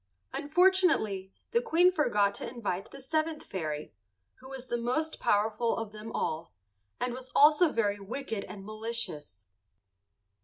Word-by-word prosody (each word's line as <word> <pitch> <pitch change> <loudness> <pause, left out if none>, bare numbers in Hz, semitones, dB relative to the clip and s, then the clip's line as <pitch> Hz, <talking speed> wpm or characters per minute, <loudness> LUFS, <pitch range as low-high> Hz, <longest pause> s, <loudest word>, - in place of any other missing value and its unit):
Unfortunately 305 - +2 0.2
the 470 - +3
Queen 360 -6 +4
forgot 210 - +2
to - - -5
invite 205 -6 -4
the 275 - -11
seventh 310 +3 -1
fairy, 155 -5 -4 0.5
who 260 - -12
was 265 -2 -7
the 240 - -2
most 255 +7 -1
powerful 220 +3 +1
of 225 -2 -4
them 215 +1 -8
all, 160 +2 -3 0.4
and 250 -1 -1
was 255 +1 -8
also 305 +3 +7
very 205 -6 0
wicked 220 0 -4
and 195 -2 -9
malicious. 215 - -3
235 Hz, 140 wpm, -30 LUFS, 200-300 Hz, 0.5 s, also